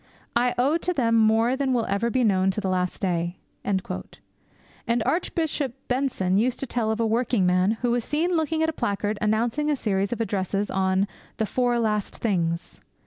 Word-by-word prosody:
I 245 +1 +2
owe 275 +6 +3
to 360 +2 -2
them 235 -7 +1
more 225 +2 +4
than 265 -1 0
will 235 -2 +1
ever 200 +4 0
be 255 +1 +1
known 190 -3 +3
to - - +2
the 195 -2 -2
last 180 -1 -1
day.' 175 -1 -1 0.3
And 190 -2 0 1.2
Archbishop 315 -6 -1
Benson 245 -8 +1
used 245 +3 0
to - - -1
tell 235 -3 -1
of 220 +1 -1
a 230 - +2
working 230 -2 +1
man 180 +3 +3
who 240 - +2
was 240 -1 +1
seen 320 +8 0
looking 320 0 +1
at 320 - +2
a - - -3
placard 205 -3 -2
announcing 230 +8 +1
a 295 - +2
series 200 -5 -1
of 240 - -2
addresses 200 -2 -1
on 190 +1 +1 0.3
'The 220 - +1
Four 245 +2 +1
Last 210 -3 -1
Things.' 170 -6 -1
225 Hz, 190 wpm, -25 LUFS, 195-255 Hz, 1.2 s, more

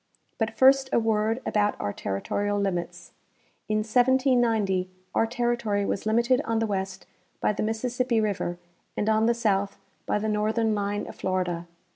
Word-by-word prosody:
But 225 0 -1
first 265 0 +5
a - - +3
word 225 +1 +1
about 210 -1 +1
our 100 0 -2
territorial 205 - -2
limits. 185 -4 -3 0.6
In 215 0 +1
1790 235 -6 +2 0.2
our 225 - +2
terri 240 0 0
tory 205 -3 0
was 200 - -2
limited 235 +4 +3
on 230 -6 -1
the 225 - +1
west 190 -2 -3 0.3
by - - +1
the - - -3
Mississippi 235 +2 0
river 200 -5 -1 0.4
and 210 - -1
on 220 +1 +3
the 235 - +3
south 200 -4 0 0.3
by - - +1
the 215 +1 -2
northern 215 +1 +1
line 205 0 -2
of - - -10
Florida. 180 -2 -2
215 Hz, 160 wpm, -26 LUFS, 200-235 Hz, 0.6 s, first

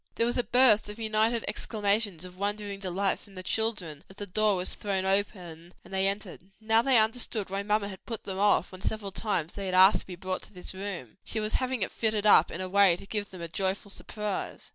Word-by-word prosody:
There 230 - +2
was 240 +1 0
a - - +2
burst 240 -5 +5
of 210 - -7
united 220 +1 +1
exclamations 205 -4 -1
of 180 0 -11
wondering 205 +1 -3
delight 195 0 -1
from 200 -2 -18
the 185 - -7
children, 185 -8 -1
as 190 - -13
the 205 - -5
door 210 +2 +2
was 180 0 -3
thrown 195 -2 -2
open 180 -4 -1
and - - -13
they 190 0 +2
entered. 200 -1 -3 0.2
Now 225 +1 +3
they 260 0 +4
understood 220 -2 0
why 195 +1 -1
mamma 210 0 0
had 190 -2 -11
put 230 -3 -5
them 190 -1 -5
off 205 -3 +3
when 185 0 -10
several 205 -1 -3
times 180 -6 -2
they 200 -1 -5
had 185 - -1
asked 190 +2 +7
to - - -8
be 180 - -7
brought 185 +1 -3
to - - -15
this 180 0 -7
room: 190 - -6
she 220 - -2
was 215 0 -2
having 255 -4 0
it - - -3
fitted 215 -2 0
up 190 -5 +7
in 180 - -5
a 185 - -3
way 195 -2 +5
to 180 - -11
give 205 0 -3
them 185 -3 -9
a - - -3
joyful 195 +3 -2
surprise. 210 -1 -5
200 Hz, 235 wpm, -28 LUFS, 185-215 Hz, 0.2 s, asked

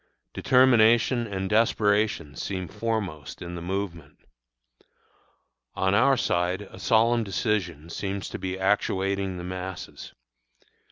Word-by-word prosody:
Determination 120 -1 +4
and 95 -2 -3
desperation 105 -7 +1
seem 95 +5 -4
foremost 100 -9 -4
in 85 0 -7
the 85 - -6
movement. 85 -5 -5 1.6
On 95 +1 +1
our 130 +6 +4
side 90 0 0
a 100 - -13
solemn 115 0 +3
decision 90 -6 -2
seems 100 +1 -4
to - - -6
be 95 0 -4
actuating 95 -1 0
the 90 - -6
masses. 95 +1 -7
95 Hz, 110 wpm, -26 LUFS, 90-110 Hz, 1.6 s, Determination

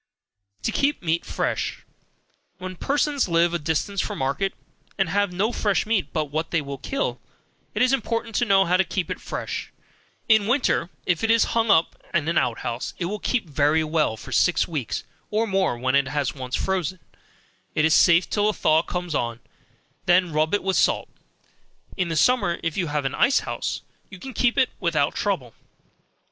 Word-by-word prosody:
To - - 0
Keep 280 -6 0
Meat 165 0 0
Fresh. - - -2 0.7
Where 185 0 -6
persons 280 - 0
live 170 0 +2
a 175 - 0
distance 160 +6 -1
from - - -4
market, 140 +9 -1 0.4
and 195 -3 +1
have 200 +1 +1
no 200 +6 0
fresh 205 -4 0
meat 215 -4 +1
but 155 -3 -2
what 160 +2 -2
they 165 -3 0 0.2
kill, 275 - -2 0.5
it - - +3
is 255 +1 +3
important 230 -2 -1
to 240 - +2
know 195 -2 +4
how 180 +1 +3
to 190 - +4
keep 185 -1 -3
it - - -5
fresh. - - -5 0.6
In 220 -2 +4
winter, 245 -8 +1 0.2
if 180 0 0
it 225 - +1
is 230 0 +5
hung 230 -1 +1
up 165 -5 +4 0.2
in 155 -3 +1
an 170 - +3
out 115 - -1
house, 120 +1 -4
it 175 - -2
will 210 +4 -3
keep 230 -5 -1
very 150 +2 +2
well 155 -7 0
for - - -10
six 180 - +3
weeks, 130 - -3 0.3
or 215 +2 +1
more, 190 - 0
when 130 +2 0
it 140 -1 +3
has 145 -1 -1
once 130 -2 -4
frozen, 185 -2 -1 0.8
it 155 - +3
is 160 - +4
safe 175 0 +5
till 210 0 +1
a - - 0
thaw 155 -4 +3
comes 180 -1 -4
on, 120 -4 -1 0.7
when 175 -1 +3
rub 155 +5 +2
it 205 - -2
with 190 0 +1
salt. - - +2 0.9
In 185 -2 0
the 165 - -2
summer, 175 0 +3
if 165 -2 -1
you 180 -4 -1
have 145 -1 -2
an 135 - -1
ice 270 - +3
house, - - -4 0.3
you 190 - -10
can 260 +8 -8
keep 240 -1 +1
it 260 - +3
without 160 -6 +1
trouble. 155 - -2
175 Hz, 190 wpm, -24 LUFS, 155-205 Hz, 0.9 s, is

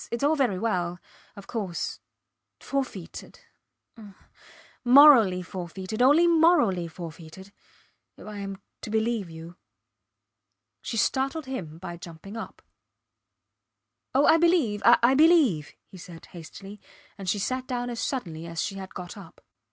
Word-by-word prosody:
Its 235 +3 -4
all 300 +2 +3
very 250 -10 +1
well... 180 -5 -2 0.4
of 200 -2 -11
course. 195 -7 -4 0.6
Forfeited 260 -11 -6 0.5
ah! 210 -4 -13 0.7
Morally 245 -8 +7
forfeited 185 +4 -6
only 290 +7 +5
morally 315 - +3
forfeited... 165 +3 -10 0.7
if - - -13
I 210 -1 -8
am 195 -1 -6 0.2
to - - -7
believe 220 -3 -1
you... 165 +2 -11 1.2
She 230 - -5
startled 270 +7 0
him 180 -13 -6
by 175 0 -8
jumping 170 +4 -11
up. 225 - -8 1.5
Oh! 275 - +4
I 320 - +6
believe, 325 - +2
I 240 +2 +5
believe, 285 - +3
he 185 - -14
said, 170 -1 -12
hastily, 195 +4 -11 0.3
and 195 -3 -6
she 205 - +1
sat 255 +6 -3
down 245 -2 -3
as 235 - -5
suddenly 170 - -4
as 165 -1 -6
she 195 - -3
had 190 -1 -9
got 180 -1 -7
up. 195 -5 -13
205 Hz, 135 wpm, -26 LUFS, 180-260 Hz, 1.5 s, Morally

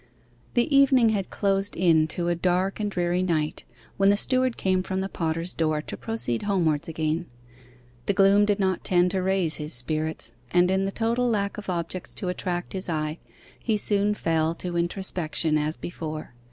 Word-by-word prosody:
The 240 +4 +2
evening 265 -4 +6
had 200 -3 -1
closed 195 0 0
in 165 -3 +4
to 170 +2 -2
a 175 - +2
dark 180 +3 0
and 210 -1 -1
dreary 175 -1 0
night 160 -4 -1 0.3
when 195 0 +4
the 205 - +4
steward 255 +2 +1
came 185 -1 +1
from 190 0 -3
the 190 - -1
potter's 165 -1 -2
door 155 -2 0
to - - -6
proceed 225 - -3
homewards 170 -8 +1
again. 160 +1 -2 0.8
The - - +3
gloom 195 +1 +5
did 205 0 +1
not 190 -2 0
tend 180 -1 +3
to 190 0 0
raise 185 -4 +1
his 150 0 -4
spirits, 155 +1 -2 0.2
and 180 +6 +3
in 190 0 +1
the 195 - -2
total 235 +3 0
lack 200 -2 -1
of 205 - -8
objects 175 0 -3
to 185 - -3
attract 175 -1 -3
his 185 -1 -2
eye, 155 0 -2 0.4
he 220 -3 0
soon 205 0 +1
fell 165 -2 0
to 175 0 -5
introspection 170 -3 0
as 155 +1 0
before. 155 -5 -6
180 Hz, 180 wpm, -25 LUFS, 165-200 Hz, 0.8 s, evening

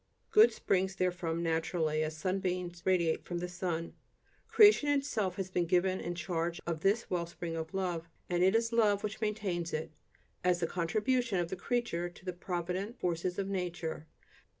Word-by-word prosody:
Good 440 +2 +7
springs 190 0 0
therefrom 175 -3 -1
naturally, 160 -1 0
as 155 0 -2
sunbeams 180 0 -2
radiate 170 -4 +2
from 175 - -4
the 175 +1 -3
sun. 175 -2 -3 0.5
Creation 415 -9 +6
itself 275 -10 0
has 190 -1 -4
been 175 -2 +1
given 185 +2 +2
in 175 +1 -3
charge 170 0 -2
of 165 -2 -2
this 200 +7 +2
wellspring 170 -1 -3
of 160 0 -4
love, 175 -3 -2 0.2
and 175 -1 0
it 190 +3 +5
is 230 0 +1
love 210 -3 +3
which 215 +1 -4
maintains 200 -6 -2
it, 155 0 -3 0.5
as 180 -1 +3
the 170 - +1
contribution 215 +7 0
of 175 -1 0
the - - -3
creature 180 -4 -1
to 175 - -17
the 180 - -2
provident 180 +5 -3
forces 175 +1 -1
of 195 - -1
nature. 175 -5 -3
180 Hz, 170 wpm, -32 LUFS, 170-195 Hz, 0.5 s, Good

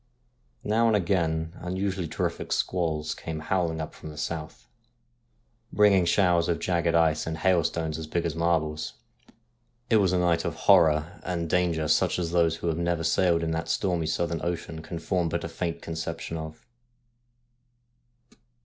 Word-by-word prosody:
Now 115 +2 +2
and 110 - +3
again 85 -4 0
unusu 95 +2 -2
ally 85 - -2
terrific - - -3
squalls 80 -4 -1
came 80 -1 -6
howling 85 0 -1
up 80 - -5
from 80 - -10
the 75 - -10
south, 75 -6 -5 1.0
bringing 100 -3 +4
showers 85 -1 +3
of 85 - +1
jagged 85 -1 0
ice 80 -2 +2
and 80 0 -3
hailstones 80 -2 +1
as 80 - -6
big 85 +2 -1
as 85 - -1
marbles. 80 -2 0 1.0
It 110 - +6
was 95 -4 +3
a 90 - +2
night 85 -2 +2
of - - -3
horror 80 -4 +4
and 85 -2 -2
danger 85 -2 +1
such 75 - +2
as 85 -2 -2
those 85 -2 +3
who 85 - -5
have 80 0 0
never 85 -1 0
sailed 85 +1 +2
in 80 - -1
that 80 +1 -3
stormy 90 -5 0
southern 85 0 -1
ocean 85 -2 -4
can 85 - -6
form 85 0 -1
but - - -2
a - - -3
faint 85 -2 -4
conception 80 0 -5
of. 80 -1 -7
85 Hz, 165 wpm, -27 LUFS, 80-90 Hz, 1.0 s, It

